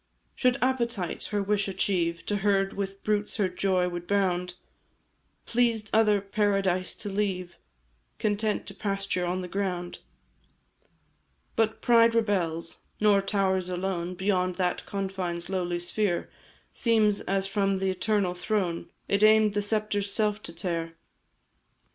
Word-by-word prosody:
"Should 250 Hz, 0 st, +2 dB
appetite 235 Hz, -8 st, -1 dB
her 205 Hz, -1 st, -1 dB
wish 205 Hz, 0 st, +1 dB
achieve, 175 Hz, -3 st, 0 dB
To 205 Hz, -, 0 dB
herd 195 Hz, -1 st, +1 dB
with 195 Hz, 0 st, -5 dB
brutes 210 Hz, -1 st, 0 dB
her 200 Hz, -, +2 dB
joy 185 Hz, 0 st, +1 dB
would 175 Hz, -1 st, -5 dB
bound; 180 Hz, -3 st, 0 dB, 0.9 s
Pleased 230 Hz, -3 st, +1 dB
other 215 Hz, -2 st, +4 dB
paradise 195 Hz, -2 st, 0 dB
to 210 Hz, -, -7 dB
leave, 190 Hz, -3 st, -2 dB, 0.6 s
Content 210 Hz, 0 st, 0 dB
to -, -, -7 dB
pasture 195 Hz, -3 st, -2 dB
on 180 Hz, +1 st, -1 dB
the 180 Hz, -, -5 dB
ground. 180 Hz, -2 st, -3 dB, 1.6 s
"But 220 Hz, 0 st, 0 dB
pride 230 Hz, -1 st, +5 dB
rebels, 170 Hz, -7 st, 0 dB, 0.2 s
nor 205 Hz, -2 st, +4 dB
towers 190 Hz, -2 st, 0 dB
alone 180 Hz, -1 st, -2 dB
Beyond 185 Hz, -1 st, 0 dB
that 180 Hz, -1 st, -1 dB
confine's 190 Hz, -3 st, -3 dB
lowly 175 Hz, -2 st, -1 dB
sphere 175 Hz, +1 st, -1 dB, 0.4 s
Seems 215 Hz, -3 st, +3 dB
as 195 Hz, 0 st, 0 dB
from 195 Hz, 0 st, +1 dB
the 190 Hz, 0 st, 0 dB
Eternal 190 Hz, -1 st, 0 dB
Throne 180 Hz, -3 st, -2 dB, 0.2 s
It 200 Hz, 0 st, +1 dB
aim'd 215 Hz, -1 st, +6 dB
the 205 Hz, -, +1 dB
sceptre's 205 Hz, -1 st, 0 dB
self 210 Hz, 0 st, 0 dB
to -, -, -7 dB
tear. 165 Hz, -1 st, -3 dB
195 Hz, 130 wpm, -27 LUFS, 180-210 Hz, 1.6 s, aim'd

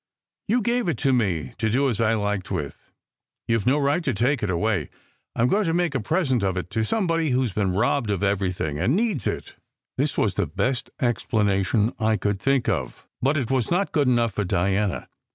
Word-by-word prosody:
"You 235 Hz, +4 st, +2 dB
gave 240 Hz, 0 st, 0 dB
it 160 Hz, -8 st, 0 dB
to 135 Hz, -, +4 dB
me 95 Hz, -10 st, 0 dB
to 110 Hz, -1 st, +1 dB
do 135 Hz, +6 st, +2 dB
as 115 Hz, -4 st, -1 dB
I 115 Hz, 0 st, +3 dB
liked 105 Hz, -3 st, -2 dB
with. 75 Hz, -7 st, -5 dB, 0.6 s
You 115 Hz, 0 st, +2 dB
ve 105 Hz, -, +1 dB
no 140 Hz, -, +3 dB
right 145 Hz, +4 st, +1 dB
to 130 Hz, -7 st, -1 dB
take 125 Hz, +5 st, +1 dB
it 105 Hz, -, -1 dB
away. 90 Hz, -1 st, 0 dB, 0.5 s
I 115 Hz, -, +1 dB
m -, -, +4 dB
going 205 Hz, +8 st, +2 dB
to 165 Hz, -1 st, 0 dB
make 175 Hz, -4 st, +1 dB
a 135 Hz, -, 0 dB
present 130 Hz, -, 0 dB
of 95 Hz, -1 st, 0 dB
it 90 Hz, 0 st, -4 dB
to 110 Hz, -, 0 dB
somebody 165 Hz, -, 0 dB
who 130 Hz, 0 st, +2 dB
s 120 Hz, -, -2 dB
been 95 Hz, -1 st, 0 dB
robbed 120 Hz, +2 st, +1 dB
of 100 Hz, -1 st, -1 dB
everything, 90 Hz, -7 st, -1 dB
and 115 Hz, -, +2 dB
needs 200 Hz, -, 0 dB
it." -, -, -4 dB, 0.5 s
This 145 Hz, +1 st, 0 dB
was 100 Hz, -, +2 dB
the 100 Hz, -2 st, -1 dB
best 100 Hz, -, -1 dB
explanation 105 Hz, -4 st, +1 dB
I 110 Hz, -1 st, +2 dB
could 105 Hz, -2 st, -1 dB
think 135 Hz, +2 st, +1 dB
of. 100 Hz, -8 st, -2 dB, 0.2 s
But 140 Hz, +4 st, +2 dB
it 130 Hz, -3 st, -2 dB
was 130 Hz, -4 st, +1 dB
not 185 Hz, +3 st, +1 dB
good 145 Hz, -3 st, +2 dB
enough 120 Hz, -4 st, +2 dB
for 105 Hz, -, -1 dB
Diana. 95 Hz, +2 st, 0 dB
115 Hz, 220 wpm, -24 LUFS, 100-140 Hz, 0.6 s, to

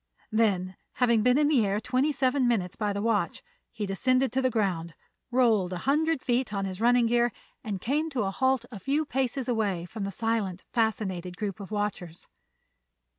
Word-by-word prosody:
Then, 190 Hz, -5 st, +1 dB, 0.2 s
having 235 Hz, -3 st, +3 dB
been 250 Hz, +3 st, +4 dB
in 295 Hz, 0 st, +4 dB
the 280 Hz, -7 st, +4 dB
air 200 Hz, 0 st, 0 dB
twenty 255 Hz, +6 st, +1 dB
seven 265 Hz, -2 st, +1 dB
minutes 190 Hz, -7 st, 0 dB
by 210 Hz, -2 st, -1 dB
the 200 Hz, 0 st, -3 dB
watch, 225 Hz, -2 st, 0 dB, 0.3 s
he 215 Hz, -3 st, -4 dB
descended 255 Hz, +6 st, +1 dB
to 265 Hz, +2 st, +1 dB
the 255 Hz, -, +2 dB
ground, 180 Hz, -8 st, -1 dB, 0.3 s
rolled 225 Hz, -7 st, +2 dB
a -, -, -3 dB
hundred 305 Hz, +1 st, +1 dB
feet 245 Hz, -1 st, 0 dB
on 195 Hz, -1 st, -2 dB
his 190 Hz, +1 st, -5 dB
running 240 Hz, 0 st, +4 dB
gear 240 Hz, +1 st, +2 dB, 0.3 s
and 205 Hz, -5 st, -3 dB
came 295 Hz, -, 0 dB
to 260 Hz, -7 st, -1 dB
a 195 Hz, -, -1 dB
halt 260 Hz, +2 st, +1 dB
a 210 Hz, -, -7 dB
few 285 Hz, -, 0 dB
paces 265 Hz, -1 st, -1 dB
away 205 Hz, -8 st, 0 dB
from 210 Hz, +3 st, -6 dB
the 195 Hz, -, -2 dB
silent, 205 Hz, -3 st, -2 dB
fascinated 190 Hz, -6 st, -1 dB
group 205 Hz, -2 st, -4 dB
of 200 Hz, -, -8 dB
watchers. 205 Hz, -5 st, -4 dB
225 Hz, 185 wpm, -28 LUFS, 195-255 Hz, 0.3 s, been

